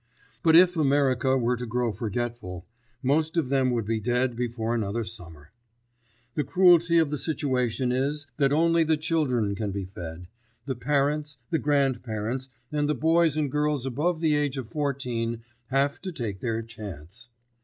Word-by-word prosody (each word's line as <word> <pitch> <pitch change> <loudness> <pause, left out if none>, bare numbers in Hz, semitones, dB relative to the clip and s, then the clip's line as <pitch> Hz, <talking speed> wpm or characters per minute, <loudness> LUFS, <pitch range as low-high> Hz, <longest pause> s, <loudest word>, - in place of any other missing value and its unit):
But 160 -1 +5
if 180 +1 +7
America 135 -3 +2
were 125 0 +1
to 125 0 -5
grow 120 0 0
forgetful, 110 -4 -4 0.4
most 155 +5 +1
of 150 -6 +1
them 135 -2 +2
would 120 -3 -1
be 110 +1 -1
dead 125 +2 0
before 120 -1 -2
another 110 0 -1
summer. 85 -9 -10 0.8
The 150 - 0
cruelty 175 -2 +5
of 160 -3 +3
the 150 - -2
situation 130 -5 0
is 140 +3 -1
that 140 -2 +3
only 165 +2 +4
the 160 0 +2
children 145 - 0
can 105 0 -3
be 100 -1 -4
fed; 90 -2 -8 0.4
the 135 - -2
parents, 145 +3 0
the 160 - +2
grandparents 130 -3 -1 0.2
and 145 -1 0
the 150 - +2
boys 160 +2 +3
and 145 -3 0
girls 150 -2 0
above 155 +6 -1
the 160 -2 +3
age 145 -2 0
of 130 -4 -4
fourteen 120 -4 -2 0.2
have 135 +2 0
to 185 - -4
take 110 - -4
their 115 0 -2
chance. 105 -2 -9
130 Hz, 165 wpm, -26 LUFS, 115-150 Hz, 0.8 s, if